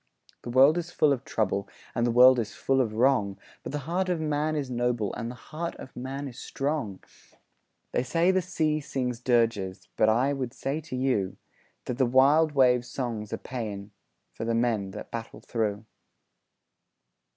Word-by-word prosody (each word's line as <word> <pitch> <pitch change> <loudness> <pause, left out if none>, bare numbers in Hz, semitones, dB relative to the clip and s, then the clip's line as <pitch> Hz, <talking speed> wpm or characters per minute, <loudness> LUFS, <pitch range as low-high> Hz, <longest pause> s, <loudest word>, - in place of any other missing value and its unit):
The - - -7
world 135 +7 +6
is 175 0 -5
full 150 -4 +3
of 130 - -4
trouble, 100 -2 -1 0.2
And 120 -1 +1
the - - +2
world 125 +1 +7
is 105 -3 -3
full 135 0 +2
of 110 -4 -1
wrong, 115 -5 +2 0.2
But - - -6
the 150 - -2
heart 185 +3 0
of 175 -2 0
man 155 0 0
is 145 -3 -2
noble, 120 -4 -1
And 115 -1 -4
the 125 - -7
heart 165 +6 -6
of 130 - -11
man 135 +3 -5
is 125 - -9
strong! 135 -9 -3 0.9
They - - +1
say 165 +8 +2
the 185 0 +2
sea 155 -3 0
sings 125 -4 -3
dirges, 115 -6 0
But 110 - +4
I 125 +6 +3
would 130 -3 -3
say 140 +4 -2
to 150 -4 -7
you 125 -8 0 0.5
That 125 +1 -4
the 130 - +4
wild 145 +5 +5
wave's 125 -3 +4
song's 115 -5 -4
a - - -2
paean 105 -5 -6 0.4
For - - -6
the 115 0 0
men 115 -4 +1
that 100 +2 -9
battle 115 -1 -6
through. 110 -2 -2
125 Hz, 180 wpm, -27 LUFS, 115-145 Hz, 0.9 s, world